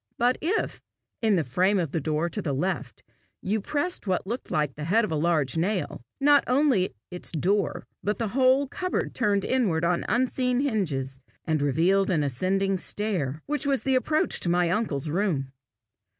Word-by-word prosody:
But 245 Hz, +2 st, +2 dB
if, 370 Hz, +7 st, -1 dB, 0.4 s
in 220 Hz, -3 st, +3 dB
the 170 Hz, -, +2 dB
frame 185 Hz, -, +2 dB
of 165 Hz, -6 st, -1 dB
the 165 Hz, -, -1 dB
door 155 Hz, +3 st, 0 dB
to 205 Hz, +4 st, -3 dB
the 150 Hz, -7 st, -2 dB
left, 185 Hz, +8 st, -3 dB, 0.4 s
you 210 Hz, +3 st, -1 dB
pressed 300 Hz, -, -2 dB
what 185 Hz, -1 st, 0 dB
looked 235 Hz, +6 st, -5 dB
like 150 Hz, -3 st, 0 dB
the 150 Hz, +2 st, -6 dB
head 215 Hz, +7 st, +3 dB
of -, -, -6 dB
a -, -, 0 dB
large 155 Hz, -2 st, +1 dB
nail, 185 Hz, -, -1 dB, 0.2 s
not 285 Hz, 0 st, +5 dB, 0.7 s
its 180 Hz, -, -4 dB
door 195 Hz, +6 st, +1 dB
only -, -, -9 dB, 0.2 s
but 210 Hz, +1 st, -1 dB
the 230 Hz, -3 st, -2 dB
whole 265 Hz, +3 st, +3 dB
cupboard 365 Hz, +6 st, -2 dB
turned 205 Hz, -6 st, +1 dB
inward 200 Hz, -11 st, +1 dB
on 175 Hz, 0 st, +1 dB
unseen 250 Hz, +2 st, +1 dB
hinges, 150 Hz, -, -1 dB, 0.3 s
and 155 Hz, -2 st, 0 dB
revealed 175 Hz, +8 st, +2 dB
an 160 Hz, -5 st, +2 dB
ascending 190 Hz, +8 st, 0 dB
stair, 170 Hz, -10 st, -3 dB
which 295 Hz, 0 st, -2 dB
was 275 Hz, -2 st, +1 dB
the 265 Hz, -, +1 dB
approach 305 Hz, +4 st, +1 dB
to 175 Hz, -, -1 dB
my 175 Hz, 0 st, +2 dB
uncle's 165 Hz, -9 st, -1 dB
room. 155 Hz, -6 st, -1 dB
190 Hz, 180 wpm, -26 LUFS, 160-240 Hz, 0.7 s, not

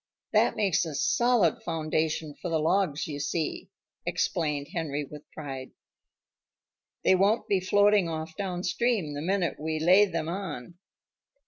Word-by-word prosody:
"That -, -, +4 dB
makes 195 Hz, -5 st, +2 dB
a 160 Hz, -4 st, -5 dB
solid 235 Hz, -, +2 dB
foundation 155 Hz, -1 st, -1 dB
for 180 Hz, -, -3 dB
the 165 Hz, -, +1 dB
logs, 165 Hz, -1 st, +1 dB
you 145 Hz, -2 st, -5 dB
see," 150 Hz, +2 st, -2 dB, 0.3 s
explained 150 Hz, -4 st, -1 dB
Henry 150 Hz, -4 st, -2 dB
with 150 Hz, +2 st, -12 dB
pride. 135 Hz, -4 st, -7 dB, 1.3 s
"They -, -, +5 dB
won't 200 Hz, +5 st, +2 dB
be 195 Hz, -, +2 dB
floating 205 Hz, 0 st, +3 dB
off 160 Hz, 0 st, -5 dB
downstream 185 Hz, 0 st, -1 dB
the 145 Hz, -, -4 dB
minute 185 Hz, +1 st, 0 dB
we 155 Hz, +1 st, -2 dB
lay 185 Hz, +6 st, +6 dB
them 165 Hz, -5 st, -3 dB
on." 170 Hz, -4 st, -5 dB
165 Hz, 135 wpm, -28 LUFS, 155-190 Hz, 1.3 s, lay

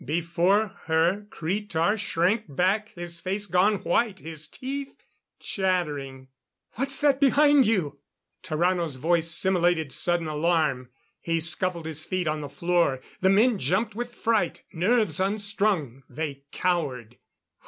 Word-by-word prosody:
Before 175 Hz, -, +1 dB, 0.2 s
her 170 Hz, +6 st, +1 dB
Cretar 190 Hz, +1 st, -1 dB
shrank 205 Hz, +1 st, 0 dB
back, 190 Hz, +9 st, +1 dB
his 175 Hz, -1 st, -6 dB
face 195 Hz, +3 st, -2 dB
gone 195 Hz, +2 st, +2 dB
white, 220 Hz, -4 st, +1 dB
his 155 Hz, -3 st, -8 dB
teeth 275 Hz, +1 st, -6 dB, 0.4 s
chattering. 145 Hz, -9 st, -2 dB, 0.4 s
"What's 270 Hz, +3 st, -2 dB
that 285 Hz, -2 st, +3 dB
behind 285 Hz, -1 st, +5 dB
you?" 160 Hz, -10 st, 0 dB, 0.4 s
Tarrano's 170 Hz, -2 st, 0 dB
voice 165 Hz, +4 st, +1 dB
simulated 175 Hz, -4 st, +1 dB
sudden 175 Hz, +5 st, 0 dB
alarm; 150 Hz, -5 st, 0 dB, 0.3 s
he 165 Hz, -1 st, -1 dB
scuffled 170 Hz, +1 st, -2 dB
his 160 Hz, -1 st, -3 dB
feet 180 Hz, 0 st, -2 dB
on 155 Hz, 0 st, -1 dB
the 145 Hz, -, -6 dB
floor. 170 Hz, -1 st, +1 dB, 0.2 s
The 190 Hz, -, +3 dB
men 215 Hz, +2 st, +4 dB
jumped 190 Hz, -, 0 dB
with 240 Hz, +2 st, -5 dB
fright; 220 Hz, -7 st, 0 dB
nerves 185 Hz, -1 st, +2 dB
unstrung, 200 Hz, -, 0 dB
they 140 Hz, -3 st, -5 dB
cowered. 135 Hz, -10 st, -2 dB
175 Hz, 125 wpm, -26 LUFS, 160-205 Hz, 0.4 s, behind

